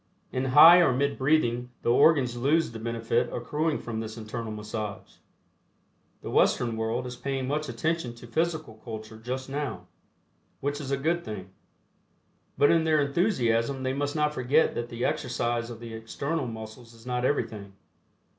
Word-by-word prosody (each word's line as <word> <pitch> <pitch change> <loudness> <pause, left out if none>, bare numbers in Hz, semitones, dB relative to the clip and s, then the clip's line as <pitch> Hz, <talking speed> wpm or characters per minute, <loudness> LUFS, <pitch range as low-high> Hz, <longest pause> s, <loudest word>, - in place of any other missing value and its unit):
In 130 +1 -1
High 160 +7 +9
or 170 -6 +5
Mid 140 +2 0
Breathing 125 -4 +2
the 120 - +2
organs 130 -2 +4
lose 145 +4 +2
the 115 - -7
benefit 115 +1 -1
accruing 150 +6 -1
from 115 -2 -5
this 110 0 -6
internal 110 0 -5
massage. 105 -1 -6 1.1
The - - -5
Western 120 -2 +2
world 115 +3 -2
is 125 0 -6
paying 135 0 -3
much 150 +2 -2
attention 125 +1 -2
to 120 - -12
Physical 155 -4 -2
Culture 110 -1 -8
just 130 +3 -4
now, 145 +1 -4 0.7
which 145 +2 -2
is 135 - -6
a 140 - +1
good 170 +5 0
thing. 95 - -7 1.1
But 145 - +5
in 165 -1 +4
their 160 -1 +3
enthusiasm 135 - +1
they 130 0 0
must 145 +1 -2
not 150 -1 +1
forget 145 +4 +2
that 120 0 -4
the 120 +1 -3
exercise 120 -1 -1
of 115 -2 -8
the 115 -1 -8
external 135 +6 -3
muscles 115 +1 -9
is 115 +1 -17
not 125 0 -2
everything. 105 -7 -1
125 Hz, 165 wpm, -27 LUFS, 115-145 Hz, 1.1 s, High